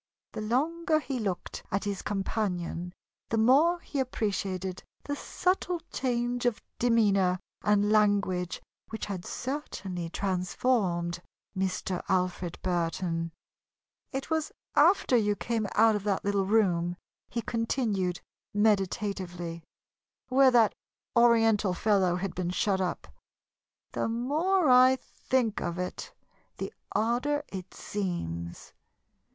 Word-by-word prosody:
The - - -5
longer 310 +8 +1
he 275 -4 -4
looked 190 -5 -3
at 195 - -1
his 200 -1 -3
companion, 185 -4 -2 0.4
the 225 - 0
more 280 +10 +5
he 285 - -4
appreciated 195 -7 -2 0.2
the 285 - -3
subtle 360 +2 -1
change 245 -1 0
of 240 - 0 0.2
demeanor 200 -6 +3 0.2
and 210 0 +3
language 200 -4 +2 0.3
which 220 - -4
had 190 -3 -5
certainly 195 - -4
transformed 180 -1 0 0.3
Mr. 185 -1 -1
Alfred 180 -2 0
Burton. 165 -1 -1 0.8
"It 270 +3 -4
was 315 -1 0 0.2
after 315 -3 +5
you 210 -3 +3
came 225 -1 -1
out 220 0 +5
of 205 - -2
that 200 -2 0
little 200 -1 +1
room," 175 -5 +2 0.3
he 235 - -3
continued, 220 -6 -1 0.3
meditatively, 190 -5 0 0.7
"where 265 +1 +6
that 235 -4 +5 0.4
Oriental 225 -5 +4
fellow 190 -3 +2
had 185 0 -3
been 180 -1 -2
shut 190 +1 +1
up. 180 - -2 0.8
The - - -1
more 305 +10 +1
I 255 +1 +7
think 255 -3 -1
of 175 0 -3
it, 180 0 -4 0.5
the - - -5 0.2
odder 250 +7 +1
it 185 -1 -8
seems. 85 - -4
205 Hz, 115 wpm, -29 LUFS, 180-245 Hz, 0.8 s, I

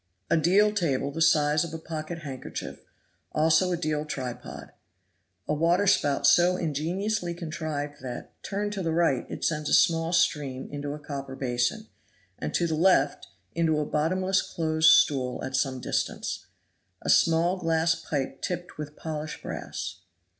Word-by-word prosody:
A - - +6
deal 195 +6 +4
table 140 -8 0
the 165 - -5
size 150 -1 +4
of 165 -1 -6
a - - -3
pocket 160 0 -6
handkerchief; 135 -3 -6 0.5
also 160 +4 +3
a 175 - 0
deal 155 -3 -1
tripod. 130 -5 -6 0.8
A - - +1
waterspout 165 -3 +2
so 175 +5 +5
ingeniously 175 +5 -2
contrived 155 -3 -5
that, 125 -2 -7
turned 205 +1 -3
to 200 - -3
the 165 -2 -1
right 165 -7 +1
it - - -4
sends 155 -2 -1
a - - +5
small 165 0 +3
stream 140 -6 +1
into 145 0 -4
a - - -9
copper 140 -2 -6
basin, 130 - -1 0.5
and - - -3
to 175 - +2
the 165 - -1
left 155 -4 +3 0.3
into 165 -2 +1
a 150 - 0
bottomless 185 +6 +1
close 160 -1 +2
stool 130 -5 +4
at 130 - -3
some 130 0 0
distance. - - -3 0.6
A - - -3
small 170 +3 +4
gas 165 -1 +2
pipe 135 -4 -4
tipped 180 -4 -4
with 150 0 -6
polished 155 -1 -5
brass. 90 0 -5
155 Hz, 155 wpm, -27 LUFS, 145-170 Hz, 0.8 s, A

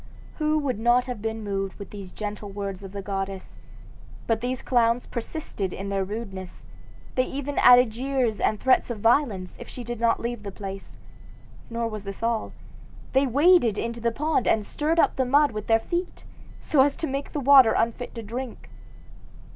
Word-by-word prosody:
"Who 305 0 +2
would 270 -7 -1
not 240 +2 +3
have 250 -5 -5
been 225 0 -3
moved 195 -1 -3
with 200 -3 -9
these 195 -3 -8
gentle 210 -1 -6
words 195 -1 -5
of 195 - -8
the 200 0 -6
goddess? 195 -1 -5 0.7
But 225 -1 0
these 250 +1 -3
clowns 235 -1 +2
persisted 230 - -5
in 195 +1 -5
their 195 -1 0
rudeness; 195 -3 -7 0.5
they 255 - +2
even 285 +1 -3
added 250 -2 +7
jeers 245 -3 -1
and 215 - +1
threats 260 -1 +3
of 235 -3 -4
violence 225 -5 +1
if - - -9
she 250 - -7
did 240 -1 -5
not 230 0 +2
leave 235 -1 -4
the 200 -1 -6
place. 195 0 -8 0.7
Nor 230 0 -2
was 215 -2 -6
this 195 +2 -7
all. 230 -1 0 0.6
They 270 +1 +3
waded 280 - +4
into 235 0 -3
the 235 0 +1
pond 300 +1 0
and 215 -2 +2
stirred 310 +8 -1
up - - +3
the 260 - +3
mud 285 +3 +4
with 215 -1 -6
their 225 - +5
feet, 350 +9 -4 0.4
so 285 - +3
as 280 +1 +3
to - - -3
make 275 -1 -4
the 295 - -2
water 265 -4 +7
unfit 235 +2 -1
to 230 - -6
drink. 240 +3 -7
230 Hz, 185 wpm, -25 LUFS, 205-260 Hz, 0.7 s, added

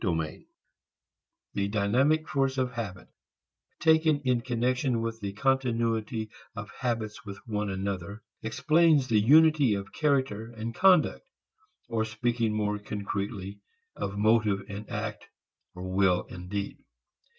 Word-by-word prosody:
III 80 -5 -2 1.1
The 100 0 0
dynamic 125 +10 +2
force 135 -1 0
of 130 -1 0
habit 100 -7 -6 0.7
taken 160 -2 +4
in 125 -3 +1
connection 125 +1 0
with 115 0 -3
the 100 -2 -4
continuity 115 -3 0 0.2
of 110 -2 -7
habits 115 -4 -3
with 100 -2 -8
one 105 -2 -2
another 100 +1 -4 0.2
explains 140 +5 +3
the 110 -2 +4
unity 150 -1 +5
of 100 0 -6
character 130 -7 0
and 115 +1 -4
conduct, 185 - +3 0.6
or 115 -1 0
speaking 115 +1 -1
more 105 -1 -1
concretely 100 -1 -4 0.4
of 95 +1 -4
motive 105 -2 +3
and 105 +1 -7
act, - - -5 0.5
will 95 0 +1
and 90 0 -8
deed. 100 0 -4
110 Hz, 120 wpm, -28 LUFS, 100-130 Hz, 1.1 s, unity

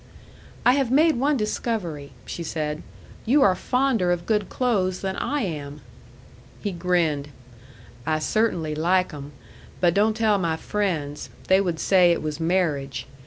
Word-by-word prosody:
"I 245 - +7
have 270 -3 +1
made 305 +3 +4
one 285 +2 +2
discovery," 195 - -3
she - - -6
said. 155 -2 -3 0.4
"You 275 +5 +4
are 190 - +5
fonder 250 -4 +1
of 175 -1 -1
good 210 -3 0
clothes 195 -8 0
than 190 -1 -2
I 290 0 -1
am." 150 - -5 0.8
He 205 - -3
grinned. 170 -5 0 0.7
"I 155 +3 0
cert'nly 165 -3 0
like 180 +3 +1
'em. 145 0 -8 0.5
But 175 -2 +3
don't 215 +3 +2
tell 215 -3 +2
my 165 -3 0
friends. 160 -8 -3 0.2
They 190 +1 +5
would 175 -4 -2
say 180 -3 +4
it 170 - 0
was 155 0 -4
marriage. 150 -7 -1
180 Hz, 150 wpm, -24 LUFS, 155-215 Hz, 0.8 s, I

